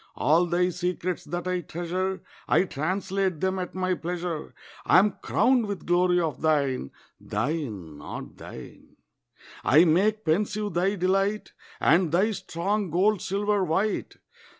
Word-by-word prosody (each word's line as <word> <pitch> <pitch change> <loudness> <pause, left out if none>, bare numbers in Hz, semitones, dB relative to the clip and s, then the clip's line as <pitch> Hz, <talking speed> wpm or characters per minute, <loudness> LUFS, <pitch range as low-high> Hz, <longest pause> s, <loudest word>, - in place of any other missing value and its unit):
All 165 +6 +3
thy 180 +1 +2
secrets 180 -1 -3
that 175 +3 -4
I 180 -1 0
treasure 180 +3 -3 0.2
I - - +4
translate 185 +2 -2
them 190 +2 0
at 180 0 -5
my 185 0 0
pleasure. 175 -2 -4 0.3
I - - +5
am 200 +1 +3
crowned 250 -3 +2
with 200 -2 -5
glory 180 0 +3
of 160 -4 -2
thine. 140 - +1 0.3
Thine, 105 - -3
not 75 - -8
thine. - - -12 0.7
I 155 +5 +6
make 205 +6 +2
pensive 205 +4 0
thy 185 +4 +1
delight, 195 +3 0 0.3
And 165 +1 +3
thy 190 +6 +3
strong 195 +1 -2
gold 190 +4 +2
silver 205 +1 0
white. 190 +6 -1
180 Hz, 135 wpm, -26 LUFS, 165-195 Hz, 0.7 s, I